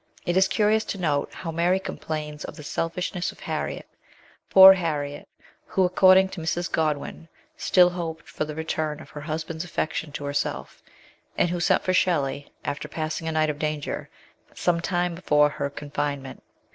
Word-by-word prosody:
It 175 -2 0
is 190 +1 +5
curious 215 +1 +2
to - - -4
note 150 -6 0
how 165 - -6
Mary 175 +3 +2
complains 150 -5 -5
of - - -7
the 150 - -10
selfishness 175 +4 -2
of - - -19
Harriet; - - -4 0.6
poor 190 0 +10
Harriet 150 -5 -3 0.4
who, 190 - +1
according 185 +1 +5
to 175 - -7
Mrs. 170 +2 -2
Godwin, 155 +1 -2 0.3
still 180 -1 +4
hoped 165 -2 -5
for - - -3
the 155 0 -6
return 155 -1 -2
of - - -13
her 150 - -8
husband's 160 +1 -4
affection 160 -2 -3
to 145 - -5
herself, 140 0 -3 0.6
and 175 - +3
who 175 - -2
sent 170 - +2
for 185 - +1
Shelley, 145 -6 0
after 145 +1 -3
passing 155 +1 -4
a - - 0
night 155 -1 +2
of 145 - -10
danger, 150 -1 -3 0.5
some 170 -1 +1
time 175 0 0
before 150 -4 +3
her 145 -1 -3
confinement. 145 -2 -4
160 Hz, 170 wpm, -25 LUFS, 150-180 Hz, 0.6 s, poor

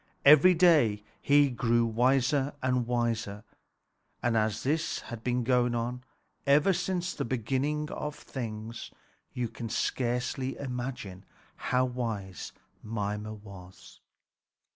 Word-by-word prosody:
Every 155 +6 +8
day 150 - +4 0.2
he 145 -1 +4
grew 120 -1 +2
wiser 130 +4 +2
and 125 -2 +1
wiser; 115 -4 -1 0.8
and 120 -1 +2
as 110 -1 0
this 155 +4 0
had 115 -1 -7
been 125 0 0
going 120 -1 +2
on 120 +2 -3 0.4
ever 150 +7 +5
since 180 0 -1
the - - -3
beginning 135 +6 -1
of 150 0 -4
things, 115 -4 -6 0.4
you 125 -1 -2
can 115 +1 -7
scarcely 125 +3 -1
imagine 125 -7 -5 0.3
how 130 0 +1
wise 110 -7 -4 0.3
Mimer 105 0 -3
was. 95 - -13
125 Hz, 115 wpm, -29 LUFS, 110-135 Hz, 0.8 s, Every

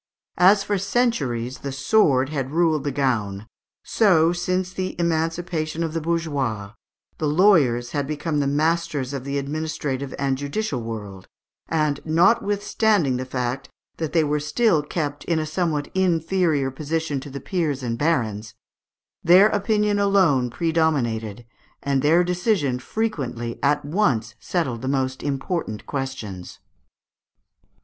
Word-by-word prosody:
As 195 +3 +6
for 205 -1 -1
centuries 145 - -1
the 140 - -5
sword 135 -2 +2
had 135 -4 -3
ruled 160 -1 +1
the 145 - 0
gown, 110 -7 -1 0.4
so, 175 -6 +3
since 185 +1 -2
the 185 0 -3
emancipation 165 -1 -1
of 160 -1 -3
the 165 - -2
bourgeois, 140 -11 -2 0.5
the 155 - 0
lawyers 145 - +3
had 145 -2 -2
become 150 0 -2 0.2
masters 155 -4 0
of 135 -2 -5
the 140 0 -2
administrative 140 -2 -3
and 135 -1 -1
judicial 145 - -2
world; 105 -4 -7 0.4
and, 150 -3 0
notwithstanding 200 - +2
the 130 - -4
fact 125 +1 -3 0.3
that 160 -2 -3
they 165 -2 +3
were 150 0 0
still 155 +4 +2
kept 145 -1 -4
in 170 - 0
a 155 - -1
somewhat 155 -2 -2
inferior 165 -5 +1
position 155 +1 -2
to 140 - -9
the 140 +1 -6
peers 150 -4 -2
and 115 -1 -3
barons, 115 -9 -1 0.7
their 185 +5 +7
opinion 210 0 +1
alone 185 -11 +3
predominated, 120 -8 -1 0.4
and 140 -1 +1
their 160 +5 +4
decision 180 - 0
frequently 130 - -3
at 145 +1 +1
once 140 - 0
settled 130 -10 -2
the 130 - -4
most 130 -1 -1
important 140 - -3
questions. 130 -10 -5
150 Hz, 130 wpm, -23 LUFS, 130-175 Hz, 0.7 s, their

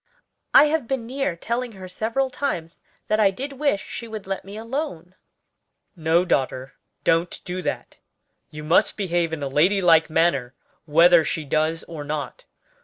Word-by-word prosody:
I - - +8
have 300 -4 0
been 265 -3 -2
near 260 -6 -2
telling 235 +6 -3
her 190 -2 -9
several 230 +8 -1
times 175 - -4 0.3
that 215 - +1
I 205 -2 +5
did 270 +9 -6
wish 275 -7 0
she 235 - -7
would 220 -2 -7
let 195 0 -4
me 200 +2 -9
alone." 225 - -5 0.8
"No, 165 +1 +2
daughter, 130 -4 -1 0.3
don't 165 +1 +1
do 180 +1 -4
that. - - -4 0.5
You 150 0 -9
must 155 +3 +2
behave 175 -4 0
in 160 -3 -4
a - - -1
lady 165 +9 +3
like 165 -3 +4
manner 155 -6 +1 0.3
whether 165 +2 +6
she 155 -1 -3
does 155 +3 0
or 160 -3 -8
not. 150 - -5
180 Hz, 165 wpm, -23 LUFS, 160-230 Hz, 0.8 s, I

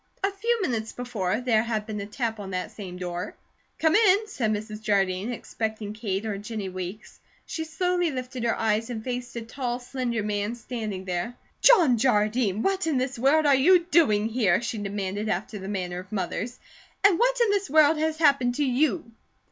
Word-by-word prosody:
A 390 - +2
few 450 +2 0
minutes 225 -7 -2
before, 220 -4 -2
there 235 -3 +3
had 220 -2 -2
been 210 -2 -4
a 200 - -6
tap 225 0 -3
on 200 -2 -6
that 185 -1 -3
same 185 -4 -8
door. 180 -1 -5 0.4
"Come 320 0 +3
in," 425 0 +4
said 235 - -1
Mrs. 215 0 -4
Jardine, 195 0 +1
expecting 220 -3 -4
Kate 210 -2 -3
or 205 -2 -3
Jennie 210 -2 -5
Weeks. 185 +3 -7 0.3
She 320 - -4
slowly 355 +1 0
lifted 255 -2 -5
her 230 - +1
eyes 220 +1 +1
and 225 -3 -5
faced 245 -1 -4
a 235 - -3
tall, 245 +1 -3
slender 245 -3 -3
man 205 +2 -2
standing 215 -5 -5
there. 180 +6 -3 0.3
"John 330 - +6
Jardine, 215 -3 +2
what 390 -2 0
in 305 -4 +1
the 255 +1 -1
world 300 +4 +4
are 285 - +6
you 310 +8 +6
doing 215 -11 +4
here?" 215 -7 +2
she 230 -1 -4
demanded 200 +1 -3
after 200 +3 -2
the 190 - -7
manner 180 -3 -3
of 185 +1 -11
mothers, 215 +5 -3 0.5
"and 390 -4 +5
what - - +3
in 465 -3 +4
this 400 -1 0
world 305 +1 +5
has 315 0 0
happened 275 -6 +3
to 290 - +1
you?" 275 +1 +1
230 Hz, 190 wpm, -26 LUFS, 205-285 Hz, 0.5 s, John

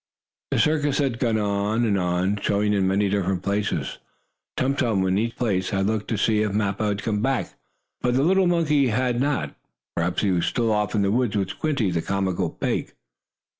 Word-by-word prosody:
The - - 0
circus 150 -2 +2
had 130 -5 0
gone 115 -3 +1
on 105 +2 0
and 105 -3 +2
on, 90 +2 0
showing 105 +1 +1
in 95 -2 +2
many 100 +2 +2
different 95 -2 -1
places. 100 +1 -2 0.6
Tum 135 +1 +1
Tum, 110 -9 +1
in 95 +1 +1
each 115 +1 -2
place, 95 -6 0
had 95 -1 0
looked 105 0 -1
to 115 - -1
see 105 +1 +2
if 105 -1 0
Mappo 105 0 0
had 105 0 -2
come 105 -2 -1
back, 135 0 -1 0.5
but 125 0 +1
the 135 - +3
little 190 +3 +3
monkey 155 -5 +2
had 120 +1 0
not. 135 - -1 0.4
Perhaps 85 +3 0
he 100 - +2
was 85 -2 +1
still 115 -2 0
off 105 0 0
in 100 - +2
the 100 - +1
woods 120 -1 +1
with 95 -2 0
Squinty, 130 -4 -1
the 85 -1 0
comical 95 -2 -1
pig. - - -3
105 Hz, 200 wpm, -24 LUFS, 100-125 Hz, 0.6 s, the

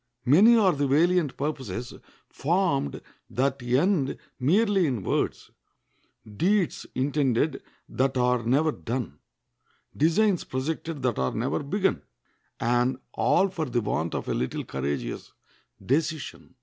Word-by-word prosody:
Many 195 - +7
are 195 -5 +4
the 145 -1 0
valiant 160 +1 +2
purposes 130 -6 -4 0.3
formed 160 - 0 0.3
that 135 +1 -1
end 135 +4 +1 0.2
merely 195 - +3
in 120 -8 -2
words; - - -2 0.7
deeds 175 - 0
intended 135 +1 +1 0.3
that 135 0 0
are 125 -1 +2
never 140 +7 +2
done; 115 - -5 0.8
designs 180 +5 +2
projected 150 +2 -4
that 125 -4 0
are 65 0 -1
never - - -1
begun; 190 +7 0 0.6
and 120 +2 +1 0.2
all 120 +12 +3
for 170 -4 -3
the 120 -3 -1
want 85 -6 -2
of - - -4
a - - 0
little 65 - -2
courageous 70 -3 -4 0.5
decision. 155 0 -2
135 Hz, 120 wpm, -26 LUFS, 120-165 Hz, 0.8 s, Many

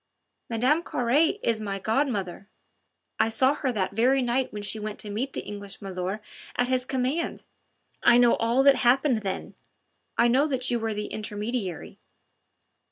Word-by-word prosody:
Mme. 255 +8 +2
Carre 295 - +1
is 225 -2 0
my 200 -2 -3
godmother.... 205 -4 -1 0.7
I - - +3
saw 260 +5 +3
her 270 -3 -1
the 195 -5 0
very 255 +5 +3
night 245 +2 0
when 210 -1 -6
she 205 +2 -2
went 210 0 -5
to 210 - -7
meet 255 +6 -3
the - - -5
English 200 -1 -7
milor' 190 +1 -4 0.3
at 245 0 +1
his 255 -1 +1
commands. 265 +6 -2 0.6
I 240 - +6
know 245 -1 +5
all 235 +4 +2
that 280 -1 +6
happened 255 +1 +3
then.... 195 -3 -4 0.6
I 235 - +5
know 265 +5 +3
that 260 -3 -2
you 240 - +1
were 225 -1 -2
the 210 0 -3
intermediary." 210 -3 -4
235 Hz, 165 wpm, -26 LUFS, 210-260 Hz, 0.7 s, I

